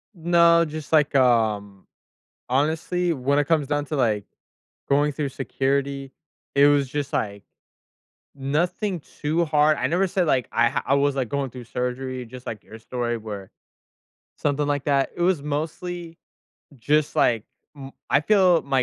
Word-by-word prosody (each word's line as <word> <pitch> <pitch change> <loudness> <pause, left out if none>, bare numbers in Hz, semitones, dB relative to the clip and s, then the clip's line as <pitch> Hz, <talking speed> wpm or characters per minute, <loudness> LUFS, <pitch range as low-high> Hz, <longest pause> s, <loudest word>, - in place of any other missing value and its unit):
No, 170 0 +4
just 155 0 -7
like, 150 -2 +3
um, 110 -6 +1 0.6
honestly, 160 +6 0
when 140 0 0
it 145 - +2
comes 155 -4 +2
down 145 0 -1
to, 150 - -4
like, 110 -7 +1 0.6
going 145 +1 +3
through 145 -1 -3
security, 135 +1 -2 0.4
it 140 +1 +6
was 145 -2 +3
just, 145 0 -4
like, 100 -1 -2 0.9
nothing 170 +7 -1
too 155 +4 -2
hard, 155 -1 +3
I - - 0
never 180 +6 +1
said, 185 -2 0
like, 130 -4 +1
I 115 0 +3
ha - - -2
I 140 - +3
was, 140 0 +2
like, 130 -3 -1
going 140 +1 -2
through 125 0 -10
surgery, 125 +1 -4
just 125 +2 -11
like 110 - -6
your 110 - -12
story, 120 +1 -3
where 105 -3 -8 0.9
something 145 0 0
like 145 -1 -1
that, 140 -2 +1
it - - -5
was 175 -3 +2
mostly 165 +3 -4 0.6
just 145 +5 +1
like 115 -3 +2 0.3
m 135 -1 -9 0.2
I 140 - +4
feel 185 -1 +4
my 135 -2 +1
140 Hz, 160 wpm, -24 LUFS, 125-155 Hz, 0.9 s, it